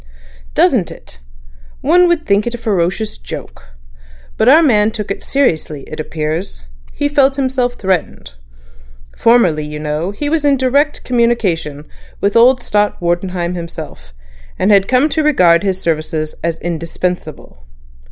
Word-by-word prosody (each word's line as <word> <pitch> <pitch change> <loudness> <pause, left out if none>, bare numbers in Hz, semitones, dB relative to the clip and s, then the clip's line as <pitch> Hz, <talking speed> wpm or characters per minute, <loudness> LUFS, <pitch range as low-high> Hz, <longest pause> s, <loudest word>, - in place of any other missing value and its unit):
"Doesn't - - +3
it? - - -13 0.6
One 355 +4 +4
would 345 -2 0
think 200 +2 +1
a 240 0 -3
ferocious 205 -1 -2
joke. - - -10 0.6
But 220 - +3
our 315 +5 +7
man 215 -7 +3
took 210 -2 -5
it - - -4
seriously, 160 - -1
it 155 - -9
appears. 155 - -4 0.3
He 290 - -1
felt 280 -2 +2
himself 260 -2 0
threatened. 185 -4 -1 1.1
In 235 +1 +6
the - - +4
time, 155 - -5
you 150 0 -5
know, 150 +3 -2
he 205 +9 -4
was 310 0 0
in 285 -1 +3
direct 280 +4 +1
communication 195 - 0 0.3
with 200 0 0
old 245 +2 +5
Stott 210 0 0
Wartenheim 175 0 -2
himself, 165 - -8 0.5
and 195 - +2
had 195 -1 +4
come 255 +4 +3
to 315 - 0
regard 180 - +4
his 190 -2 -1
services 155 -2 -2
as 165 -1 -1
indispensable. 165 - -5
195 Hz, 145 wpm, -16 LUFS, 165-255 Hz, 1.1 s, our